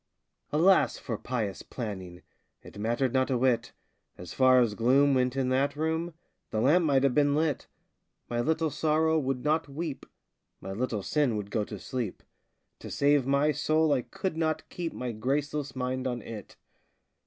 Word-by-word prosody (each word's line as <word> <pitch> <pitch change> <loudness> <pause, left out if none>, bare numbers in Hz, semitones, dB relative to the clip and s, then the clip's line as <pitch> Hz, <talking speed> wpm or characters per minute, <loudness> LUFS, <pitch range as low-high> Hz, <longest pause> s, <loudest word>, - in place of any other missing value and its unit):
Alas 180 +6 +4
for 115 - -4
pious 110 -4 -3
planning 95 -7 -7 0.4
It - - -12
mattered 120 +4 0
not 130 0 +2
a 130 - +1
whit! 125 -1 +1 0.5
As 90 -1 -9
far 130 -1 +5
as 115 -4 +2
gloom 135 +6 +4
went 125 -1 +1
in 130 -1 0
that 135 +2 +1
room, 160 +2 -2 0.3
The 110 - -2
lamp 155 +9 +4
might 135 -3 +3
have 135 -2 +3
been 145 0 +3
lit! 155 -3 0 0.6
My 120 0 -1
little 160 +3 0
Sorrow 160 +2 +2
would 130 -3 -2
not 155 0 +1
weep, 150 0 -5 0.5
My 95 - -7
little 110 -1 -2
Sin 140 -5 +1
would 100 -1 -6
go 110 - 0
to 105 - -7
sleep 120 -2 -5 0.6
To - - -9
save 145 -2 +2
my 140 +2 +3
soul 155 0 +2
I 130 - +1
could 190 +3 -4
not 160 -1 -1
keep 170 -2 -4
My 125 -1 -4
graceless 140 +4 -2
mind 130 0 -2
on 120 -3 -3
it! 110 -3 -9
135 Hz, 170 wpm, -28 LUFS, 120-150 Hz, 0.6 s, far